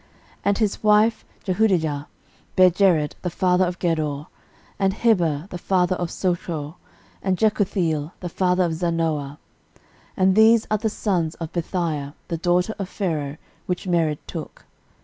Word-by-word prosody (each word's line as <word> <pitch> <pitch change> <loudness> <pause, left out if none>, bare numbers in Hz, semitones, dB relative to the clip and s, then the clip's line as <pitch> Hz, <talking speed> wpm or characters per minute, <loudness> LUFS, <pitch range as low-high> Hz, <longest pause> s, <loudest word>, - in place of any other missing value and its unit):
13:004:018 - - -36
And 200 -1 +2
his 215 -2 -1
wife 215 +1 +4 0.2
Jehudijah 175 -8 +1 0.5
bare 185 -1 +6
Jered 170 -5 +3
the 180 - -2
father 180 +2 +2
of 175 0 -4
Gedor, 155 -4 -1 0.5
and 195 0 +1
Heber 175 -10 +2
the 180 - -5
father 185 0 +1
of 175 -1 -3
Socho, 170 -4 -3 0.4
and 190 -1 0
Jekuthiel 180 -8 +1
the 180 - -5
father 180 +1 +1
of 170 -2 0
Zanoah. 160 -4 -1 0.8
And 190 -1 +4
these 220 +2 +5
are 215 - +2
the 220 +1 0
sons 175 -6 -1
of 165 0 -6
Bithiah 160 -4 -2
the 170 - -1
daughter 180 +5 +1
of 195 -1 -4
Pharaoh, 155 -8 -2 0.3
which 180 0 -2
Mered 165 -4 +1
took. - - -8
180 Hz, 150 wpm, -23 LUFS, 160-190 Hz, 0.8 s, bare